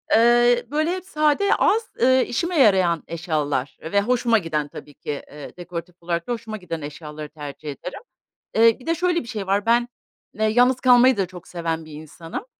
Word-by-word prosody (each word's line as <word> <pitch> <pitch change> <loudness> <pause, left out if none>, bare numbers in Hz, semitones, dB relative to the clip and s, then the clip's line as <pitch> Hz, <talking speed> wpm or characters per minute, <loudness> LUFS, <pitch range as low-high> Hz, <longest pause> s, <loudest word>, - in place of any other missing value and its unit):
eee, 240 +1 +4
böyle, 310 +3 +1
hep 370 0 -4
sade, 305 +4 +2
az, 450 +2 +2
eee, 260 +1 +4
işime 340 +5 -1
yarayan 185 - +4
eşyalar 150 -5 -2
ve 200 +6 +1
hoşuma 235 +1 +2
giden 155 -5 -2
tabii 145 0 -11
ki, - - -6 0.2
eee, 145 +2 -10
dekoratif 175 0 -7
olarak 170 0 -3
da - - -3
hoşuma 225 -2 -6
giden 165 -5 -6
eşyaları 150 +1 -8
tercih 145 0 -8
ederim. 180 +6 -8 0.5
Eee, 225 +1 +5
bir 250 - -15
de 330 - +1
şöyle 355 0 +1
bir 235 - -13
şey 210 -5 -5
var, 200 +2 +1
ben, 240 +1 +3 0.5
eee, 220 - -1
yalnız 245 +4 +3
kalmayı 255 0 +5
da 195 - +1
çok 180 -1 -12
seven 165 -2 -3
bir 155 - -13
insanım. 165 - -8
200 Hz, 185 wpm, -22 LUFS, 165-245 Hz, 0.5 s, Eee